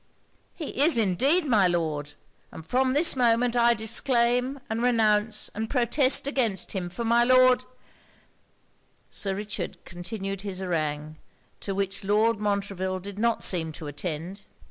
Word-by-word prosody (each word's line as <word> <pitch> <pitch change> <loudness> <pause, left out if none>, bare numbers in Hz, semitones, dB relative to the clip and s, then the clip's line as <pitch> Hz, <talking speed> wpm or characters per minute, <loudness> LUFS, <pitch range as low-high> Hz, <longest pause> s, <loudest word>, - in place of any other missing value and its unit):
'He 300 -4 -4
is 310 -2 +4
indeed, 260 - +2
my 215 -9 +4
Lord! 155 -4 -2 0.4
and 160 - -10
from 255 +7 +1
this 300 +3 +3
moment 240 -1 +2
I 235 0 +4
disclaim, 240 +3 +1
and 220 +1 -3
renounce 220 -3 +2
and 220 +1 -4
protest 255 +2 +2
against 235 -10 -1
him; 180 -3 -4
for 230 +7 -5
my 235 +1 +4
Lord 255 0 +4 0.8
' - - -41 0.3
Sir 195 -2 -1
Richard 205 -2 -5
continued 195 +2 -6
his 195 -2 -6
harangue, 155 -4 -3 0.4
to 195 - -5
which 195 0 -3
Lord 215 +2 +2
Montreville 200 -2 -2
did 200 +2 -9
not 235 +1 +1
seem 165 -3 +1
to 155 - -9
attend. 165 +6 -6
210 Hz, 145 wpm, -26 LUFS, 185-240 Hz, 0.8 s, is